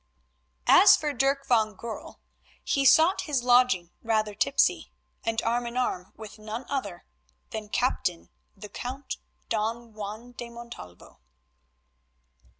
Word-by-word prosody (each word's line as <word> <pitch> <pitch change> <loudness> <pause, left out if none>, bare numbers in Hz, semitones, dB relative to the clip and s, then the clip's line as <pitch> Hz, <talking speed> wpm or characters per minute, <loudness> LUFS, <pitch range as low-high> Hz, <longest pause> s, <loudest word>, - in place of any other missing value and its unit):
As - - +8
for 295 -1 -2
Dirk 275 +2 +1
van 220 -4 +2
Goorl, 230 +2 -8 0.4
he 275 -1 +1
sought 325 +7 +6
his 270 -5 0
lodging 245 -8 +3
rather 215 -2 0
tipsy, 275 +7 +1 0.3
and 225 0 0
arm 240 +1 0
in 235 +1 -5
arm 185 -7 -2
with 215 -1 -11
none 220 +4 -6
other 205 -11 -4 0.5
than 215 -1 -6
Captain 180 -8 -1 0.3
the 210 - -9
Count 260 +6 -6 0.3
Don 225 +1 -2
Juan 215 +3 -7
de 240 -1 -8
Montalvo. 235 - -12
235 Hz, 125 wpm, -27 LUFS, 215-250 Hz, 0.5 s, As